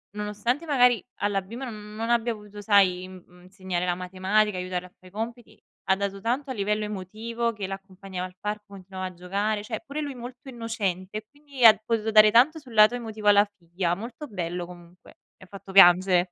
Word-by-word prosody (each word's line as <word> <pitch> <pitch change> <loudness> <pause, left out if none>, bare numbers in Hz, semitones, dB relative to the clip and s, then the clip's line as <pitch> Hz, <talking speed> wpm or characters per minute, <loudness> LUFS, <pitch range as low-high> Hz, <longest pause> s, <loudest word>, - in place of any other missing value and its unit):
nonostante 210 +8 -2
magari 250 -6 +3
alla 205 -1 +1
prima 240 +7 -7
n 210 -1 -10
non 225 +1 -3
abbia 235 0 +2
potuto, 210 -1 -11
sai, 195 -3 +3
mhmm, 180 -1 -15
insegnare 185 -1 -4
la 180 - +1
matematica, 190 +3 0
aiutarl 180 0 -3
a 180 - -13
fà 185 - -24
i 185 - -14
compiti, 230 +3 -7 0.3
ha 190 - +4
dato 195 0 -3
tanto 250 +7 -2
a - - -2
livello 210 -1 -1
emotivo, 220 +4 -3
che 205 -3 -5
l'accompagnava 195 -1 -7
al 180 0 -11
parco, 210 +1 -4
continuava 190 -1 -8
a 185 - -9
giocare, 200 +4 -2
cioè - - -5
pure 295 +1 -4
lui 285 -3 -5
molto 250 +3 -10
innocente 215 -6 -3
e 215 - -7
quindi 285 -2 -7
ha 220 -2 +9
potuto 225 -1 0
dare 215 0 +7
tanto 260 +9 +5
sul 255 -5 -14
lato 215 +2 +6
emotivo 220 -3 -5
alla 205 0 +7
figlia, 175 0 -2
molto 235 - -8
bello 175 -4 -4
comunque. 175 0 -15 0.3
E - - -16
ha - - -15
fatto 195 0 -11
piange 180 -1 +6
205 Hz, 200 wpm, -26 LUFS, 185-230 Hz, 0.3 s, ha